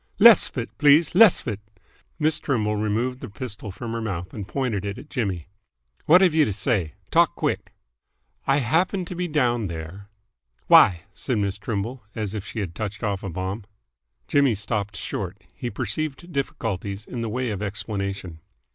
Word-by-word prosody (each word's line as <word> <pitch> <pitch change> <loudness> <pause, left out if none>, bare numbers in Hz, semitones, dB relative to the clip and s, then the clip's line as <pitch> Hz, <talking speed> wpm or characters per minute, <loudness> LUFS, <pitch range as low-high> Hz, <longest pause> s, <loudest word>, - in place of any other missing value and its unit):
"Less 230 -2 +8
'f - - -13
it, 120 - -4
please. 150 +2 +5
Less 210 0 +7
'f - - -13
it!" 105 -4 -2 0.6
Miss 155 0 +1
Trimble 105 -6 0
removed 110 +5 -1
the - - -7
pistol 105 -1 -6
from 115 +4 -6
her 115 0 -3
mouth 95 -5 -4
and 100 -3 -6
pointed 120 -6 -1
it 100 0 -4
at 145 - -12
Jimmy. 95 - -2 0.6
"What've 180 +1 +6
you 160 -1 +5
to 105 - 0
say? 95 - 0 0.2
Talk - - +4
quick!" - - -2 0.7
"I 135 - +4
happened 175 - +1
to 180 - -5
be 180 +1 -2
down 120 - +1
there 85 +4 -7 0.3
" - - -45
"Why?" 85 -3 +7
asked 100 - -8
Miss 100 -5 0
Trimble, 115 +4 -3
as 105 -2 -3
if 105 -3 -4
she 110 - -4
had 90 -4 -4
touched 105 +1 -5
off 100 -3 -1
a 100 - -5
bomb. 95 +5 -4 0.6
Jimmy 140 -5 +3
stopped 105 -1 -3
short. 95 0 -5
He 120 - -4
perceived 135 - -3
difficulties 105 -7 -3
in 120 - -5
the 115 - -2
way 125 +1 -1
of 100 -1 -4
explanation. 100 -4 -4
110 Hz, 180 wpm, -24 LUFS, 100-135 Hz, 0.7 s, Less